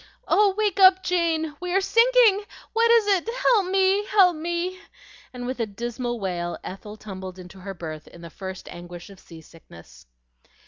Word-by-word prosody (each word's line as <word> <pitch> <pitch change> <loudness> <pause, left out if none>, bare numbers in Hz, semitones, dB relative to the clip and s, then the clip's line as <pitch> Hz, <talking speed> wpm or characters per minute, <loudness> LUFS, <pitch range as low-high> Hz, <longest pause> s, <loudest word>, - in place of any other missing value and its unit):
"Oh, 405 -2 +3
wake 415 -3 0
up, 375 0 +7
Jane! 325 -3 0
We 360 0 -3
are - - +5
sinking! 460 0 +4 0.3
What 460 +1 +3
is 460 -2 +5
it? 400 +1 +1
Help 420 -7 +3
me, 385 +1 +2
help 380 -5 +4
me!" 345 +3 -3 0.5
and 245 -1 -7
with 255 0 -4
a 230 - -1
dismal 240 +3 -4
wail 175 -3 -3
Ethel 210 +3 -9
tumbled 190 -3 -8
into 185 +1 -12
her 195 +1 -7
berth 155 -3 -8
in 170 - -14
the 170 -1 -10
first 190 0 -8
anguish 175 +2 -10
of 195 - -15
seasickness. 85 - -16
255 Hz, 170 wpm, -24 LUFS, -, 0.5 s, up